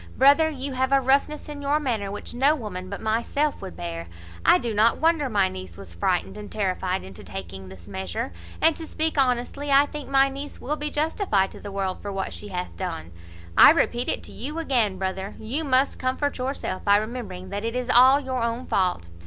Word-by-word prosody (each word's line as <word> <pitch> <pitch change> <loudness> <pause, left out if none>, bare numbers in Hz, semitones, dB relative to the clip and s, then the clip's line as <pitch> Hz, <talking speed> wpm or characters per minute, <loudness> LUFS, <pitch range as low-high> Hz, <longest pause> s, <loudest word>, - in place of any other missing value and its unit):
Brother, 285 +4 +6
you 275 -2 -4
have 260 +1 0
a 275 - +5
roughness 280 +3 +1
in 295 -1 -7
your 285 +2 +1
manner 230 -9 -2
which 205 - -7
no 275 +5 +4
woman 185 -8 -6
but 200 - -6
myself 235 +7 0
would 85 - -8
bear. 85 -1 -5 0.4
I - - +6
do 235 +1 -3
not 220 +3 +4
wonder 320 -3 +2
my 200 -4 +3
niece 95 - -8
was 95 -4 -10
frightened 180 - -1
and 210 - -9
terrified 190 -2 -1
into 95 -1 -10
taking 95 0 -8
this 95 -2 -13
measure; 95 -2 -4 0.3
and, 325 - +5
to 325 - -6
speak 315 +1 -1
honestly, 260 +2 0
I 280 +1 +6
think 295 -1 -7
my 275 0 +5
niece 275 +2 -7
will 295 +4 -2
be 300 0 -3
justified 295 - +1
to - - -11
the 205 - -8
world 195 -1 -3
for 205 - -5
what 195 -1 -3
she 210 - -7
hath 180 -2 -5
done. 170 - -5 0.4
I - - +10
repeat 245 -6 +2
it - - -1
to - - -8
you 290 +7 -5
again, 240 -11 +1
brother, 190 +1 -3
you 255 +9 -2
must 270 -1 +2
comfort 260 +2 -1
yourself 255 -7 -3
by 200 0 +5
rememb'ring 210 -5 -5
that 205 +1 -3
it 230 +1 -2
is 250 -1 -2
all 260 +3 +7
your 260 -3 -3
own 235 +2 -2
fault. 180 - 0
235 Hz, 210 wpm, -25 LUFS, 190-280 Hz, 0.4 s, I